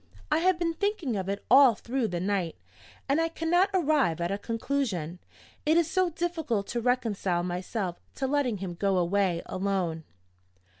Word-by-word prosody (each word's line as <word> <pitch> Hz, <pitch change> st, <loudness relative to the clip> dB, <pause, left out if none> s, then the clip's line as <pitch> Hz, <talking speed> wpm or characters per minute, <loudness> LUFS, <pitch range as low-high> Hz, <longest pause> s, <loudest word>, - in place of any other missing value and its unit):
I 305 Hz, -, +4 dB
have 365 Hz, +1 st, +3 dB
been 340 Hz, -1 st, 0 dB
thinking 400 Hz, -, -1 dB
of 190 Hz, -1 st, -3 dB
it 200 Hz, -, -4 dB
all 260 Hz, -1 st, +7 dB
through 240 Hz, +2 st, -2 dB
the 175 Hz, -4 st, -3 dB
night, 185 Hz, -3 st, -1 dB, 0.5 s
and 285 Hz, +4 st, +2 dB
I 330 Hz, -, +2 dB
cannot 335 Hz, +3 st, +2 dB
arrive 300 Hz, -, +2 dB
at 170 Hz, +2 st, -1 dB
a 200 Hz, -, -1 dB
conclusion. 220 Hz, -, -2 dB, 0.4 s
It 315 Hz, +2 st, +3 dB
is 330 Hz, -2 st, +2 dB
so 370 Hz, -2 st, +2 dB
difficult 320 Hz, -, -2 dB
to 240 Hz, -, -2 dB
reconcile 215 Hz, -8 st, 0 dB
myself 180 Hz, +1 st, -3 dB, 0.2 s
to 270 Hz, -, -2 dB
letting 265 Hz, -5 st, +1 dB
him 185 Hz, -2 st, -5 dB
go 195 Hz, +2 st, 0 dB
away 180 Hz, -1 st, +1 dB
alone. 185 Hz, -4 st, -2 dB
230 Hz, 165 wpm, -28 LUFS, 185-315 Hz, 0.5 s, all